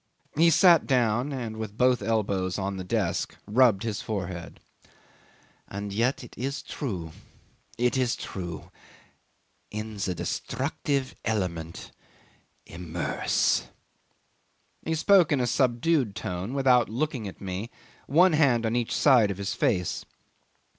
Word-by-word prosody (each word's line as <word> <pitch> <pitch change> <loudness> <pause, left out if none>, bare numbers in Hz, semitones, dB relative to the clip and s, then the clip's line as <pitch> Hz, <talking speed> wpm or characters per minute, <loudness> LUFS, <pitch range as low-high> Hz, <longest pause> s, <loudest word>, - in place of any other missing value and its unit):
He 165 +3 +5
sat 170 0 +5
down 125 0 +2
and, 115 -5 -4
with 110 -1 -6
both 125 -1 +3
elbows 100 -4 0
on 100 0 -3
the 95 - -4
desk, 90 - -1
rubbed 110 -2 +4
his 110 -3 -3
forehead. 95 -5 -5 1.1
"And 100 0 -5
yet 120 +6 0
it 120 - -12
is 135 +4 -4
true 90 - -5 0.7
it 125 +1 +1
is 125 -2 +1
true. 85 -4 -7 1.0
In 110 0 -6
the 95 -2 -2
destructive 135 - -2
element 85 -7 -3 0.7
immerse."... 85 0 -1 1.1
He 160 - -2
spoke 180 +1 +5
in 145 - +3
a 125 - +1
subdued 125 -1 +1
tone, 95 +8 -4
without 130 -3 +4
looking 125 -2 -2
at 95 - -9
me, 95 +3 -5 0.4
one 175 +5 +5
hand 130 -7 +3
on 110 +1 0
each 120 -2 -1
side 125 -7 +5
of 100 - -3
his 100 -1 -3
face. 90 -7 0
115 Hz, 125 wpm, -27 LUFS, 100-130 Hz, 1.1 s, He